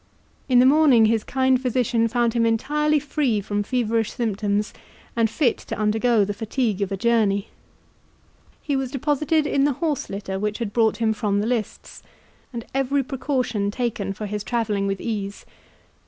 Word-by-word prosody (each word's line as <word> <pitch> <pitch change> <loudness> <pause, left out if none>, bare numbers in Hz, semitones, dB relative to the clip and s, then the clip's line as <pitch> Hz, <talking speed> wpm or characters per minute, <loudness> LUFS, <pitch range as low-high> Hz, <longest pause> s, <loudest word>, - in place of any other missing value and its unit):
In 250 - +4
the 250 - +7
morning 270 -5 +6
his 220 0 +2
kind 260 -1 +1
physician 245 -2 +1
found 235 0 +1
him 235 -1 +1
entirely 300 +7 +1
free 280 -6 0
from 205 +1 -2
feverish 225 -1 0
symptoms, 210 -2 -1 0.4
and 230 -1 +2
fit 240 +1 +1
to - - -6
undergo 215 +1 +2
the 205 - -3
fatigue 220 -1 -2
of 200 0 -1
a 195 - -2
journey. 210 -2 +1 1.1
He 285 - -1
was 265 -1 -1
deposited 295 +3 0
in 275 -2 +1
the 285 0 +2
horse 295 +1 -2
litter 195 -1 -4
which 210 +1 -2
had 225 -4 -4
brought 220 -3 +2
him 225 -1 +1
from 210 -2 0
the 205 - -1
lists, 230 -2 -4 0.5
and 235 -3 -6
every 270 +1 +1
precaution 255 -6 -1
taken 215 -3 -2
for 210 +2 -6
his 210 0 -4
travelling 210 -4 -1
with 195 -1 -2
ease. 205 -3 -4
230 Hz, 170 wpm, -23 LUFS, 210-260 Hz, 1.1 s, the